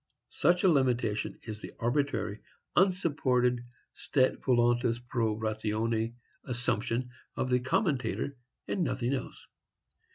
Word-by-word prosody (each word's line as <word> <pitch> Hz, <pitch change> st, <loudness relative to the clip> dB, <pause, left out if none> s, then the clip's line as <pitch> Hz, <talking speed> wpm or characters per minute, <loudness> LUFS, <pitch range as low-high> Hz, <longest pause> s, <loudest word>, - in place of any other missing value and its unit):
Such 175 Hz, +4 st, +2 dB
a -, -, +6 dB
limitation 125 Hz, -, +1 dB
is 110 Hz, -2 st, -7 dB
the -, -, -8 dB
arbitrary, 120 Hz, -4 st, 0 dB, 0.4 s
unsupported 140 Hz, -10 st, +2 dB, 0.3 s
stet 130 Hz, -2 st, +1 dB
voluntas 120 Hz, -1 st, +3 dB
pro 120 Hz, -3 st, -1 dB
ratione 110 Hz, +1 st, -1 dB, 0.3 s
assumption 125 Hz, 0 st, -1 dB, 0.2 s
of 130 Hz, -, -1 dB
the 125 Hz, -, +4 dB
commentator, 140 Hz, -, 0 dB, 0.3 s
and 190 Hz, -, 0 dB
nothing 130 Hz, -4 st, 0 dB
else. 130 Hz, -, -5 dB
125 Hz, 105 wpm, -30 LUFS, 115-135 Hz, 0.4 s, a